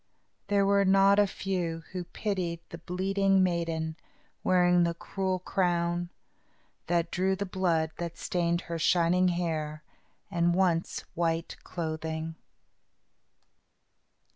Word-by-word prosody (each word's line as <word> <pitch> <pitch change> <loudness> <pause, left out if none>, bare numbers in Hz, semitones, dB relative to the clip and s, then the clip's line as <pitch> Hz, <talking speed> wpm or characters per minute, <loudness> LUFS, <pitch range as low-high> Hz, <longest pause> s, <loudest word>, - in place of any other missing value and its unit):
There 200 -1 +3
were 200 0 +4
not 195 +1 +5
a 205 - +5
few 175 -4 -3
who 180 -1 -4
pitied 175 -3 -3
the 170 - -8
bleeding 195 +2 +2
maiden 165 -2 -1 0.5
wearing 180 -1 +4
the 170 -1 +1
cruel 190 +2 -2
crown, 175 -2 0 0.8
that 170 0 +1
drew 190 +1 +1
the 200 +1 -3
blood 170 -4 0
that 170 -1 -5
stained 170 -1 0
her 170 -2 -5
shining 175 +2 +3
hair 160 -3 -2 0.5
and 170 -1 +2
once 180 -3 +1
white 165 0 -1
clothing. 160 -1 -4
175 Hz, 115 wpm, -29 LUFS, 170-190 Hz, 0.8 s, not